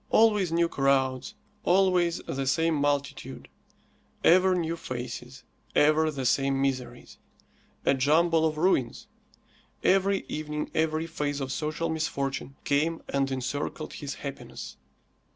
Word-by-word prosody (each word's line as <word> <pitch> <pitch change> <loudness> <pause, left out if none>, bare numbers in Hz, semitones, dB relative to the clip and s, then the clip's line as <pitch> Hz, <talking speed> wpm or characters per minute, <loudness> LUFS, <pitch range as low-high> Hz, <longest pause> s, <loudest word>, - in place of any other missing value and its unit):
Always 210 -6 +4
new 170 0 +3
crowds, 135 -3 0 0.3
always 180 -2 +3
the 135 0 -3
same 160 +5 +2
multitude, 145 -1 -2 0.8
ever 185 +2 +5
new 165 -1 -1
faces, 125 -2 -7 0.3
ever 155 +1 +4
the 135 -4 -4
same 135 +2 +2
miseries. 130 -3 -3 0.7
A - - +4
jumble 160 +5 +3
of 155 -1 -3
ruins. 155 -8 +1 0.8
Every 195 +1 +3
evening 150 0 -4
every 160 0 0
phase 145 -3 -3
of 135 -1 -3
social 155 +3 -2
misfortune 140 -4 -3
came 155 +3 0
and 135 -1 0
encircled 135 +4 -3
his 145 -2 -6
happiness. 140 -1 -8
150 Hz, 115 wpm, -27 LUFS, 135-165 Hz, 0.8 s, ever